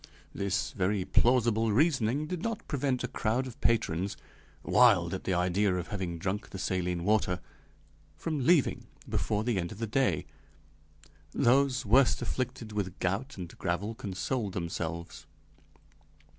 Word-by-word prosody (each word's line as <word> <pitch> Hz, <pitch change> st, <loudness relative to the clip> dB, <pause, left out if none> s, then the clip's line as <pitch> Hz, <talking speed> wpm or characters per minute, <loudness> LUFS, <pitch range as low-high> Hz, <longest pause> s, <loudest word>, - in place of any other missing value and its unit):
This 100 Hz, -4 st, -1 dB
very 95 Hz, +1 st, 0 dB
plausible 115 Hz, -2 st, +3 dB
reasoning 135 Hz, +1 st, +2 dB
did 175 Hz, +1 st, -4 dB
not 230 Hz, 0 st, -3 dB
prevent 135 Hz, -3 st, -1 dB
a -, -, 0 dB
crowd 115 Hz, +4 st, -1 dB
of 125 Hz, -3 st, -10 dB
patrons, 100 Hz, -5 st, +1 dB, 0.5 s
wild 100 Hz, -9 st, +5 dB
at 95 Hz, -, -5 dB
the 95 Hz, -, +1 dB
idea 90 Hz, +2 st, +2 dB
of 90 Hz, -1 st, -4 dB
having 95 Hz, -5 st, -3 dB
drunk 100 Hz, +5 st, -3 dB
the -, -, -7 dB
saline 90 Hz, -2 st, -1 dB
water, 95 Hz, -3 st, +2 dB, 0.8 s
from 155 Hz, -5 st, -3 dB
leaving 160 Hz, 0 st, +3 dB, 0.2 s
before 105 Hz, 0 st, 0 dB
the 115 Hz, -4 st, 0 dB
end 85 Hz, -1 st, -3 dB
of 105 Hz, -, -8 dB
the 115 Hz, -, -2 dB
day; 110 Hz, -, +1 dB, 1.1 s
those 130 Hz, +1 st, +3 dB
worst 125 Hz, +5 st, +4 dB
afflicted 125 Hz, -3 st, -3 dB
with 100 Hz, -4 st, -3 dB
gout 100 Hz, +10 st, -2 dB
and 90 Hz, -2 st, -7 dB
gravel 95 Hz, +5 st, -1 dB
consoled 105 Hz, +1 st, -3 dB
themselves. 85 Hz, -2 st, -4 dB
105 Hz, 140 wpm, -30 LUFS, 90-125 Hz, 1.1 s, wild